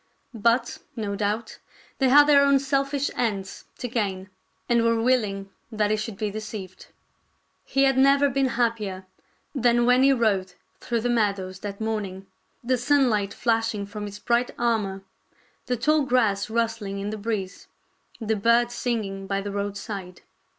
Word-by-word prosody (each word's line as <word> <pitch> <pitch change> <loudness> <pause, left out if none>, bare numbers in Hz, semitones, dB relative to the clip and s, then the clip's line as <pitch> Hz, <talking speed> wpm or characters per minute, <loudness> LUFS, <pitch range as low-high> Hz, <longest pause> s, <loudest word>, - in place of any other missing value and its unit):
But, 235 +2 +1 0.2
no 205 -3 -3
doubt, 210 +3 -2 0.4
they 265 -2 +3
had 290 +3 +8
their 285 -1 +6
own 280 0 +5
selfish 275 +1 0
ends 200 -5 -3
to 245 - -4
gain, 195 -5 -3 0.4
and 235 -1 +3
were 230 0 +2
willing 210 -5 0 0.2
that 210 -1 0
he - - +3
should 215 -1 -5
be 210 0 -2
deceived. 210 -3 -7 0.8
He 270 0 +1
had 270 -1 +3
never 275 +1 +5
been 270 0 +1
happier 225 -6 -1 0.5
than 240 -3 +3
when 250 +1 +4
he 275 +1 +6
rode 205 -7 +1 0.3
through 235 -2 -2
the 245 - -1
meadows 200 -5 0
that 200 0 -6
morning, 205 -4 -3 0.4
the 250 +1 +1
sunlight 245 -6 +2
flashing 225 -3 0
from 205 +1 -6
his 205 0 -8
bright 240 +3 +1
armor, 210 -5 -1 0.6
the 250 - 0
tall 305 +6 +2
grass 225 -7 +1
rust 230 0 -1
ling 200 -1 -5
in 200 +1 -3
the - - -3
breeze, 200 -4 -4 0.5
the 220 -1 -1
birds 235 +3 +3
singing 205 -6 -3
by 195 0 -1
the 200 +1 -5
road 200 0 -3
side. 195 -3 -7
225 Hz, 160 wpm, -25 LUFS, 200-245 Hz, 0.8 s, had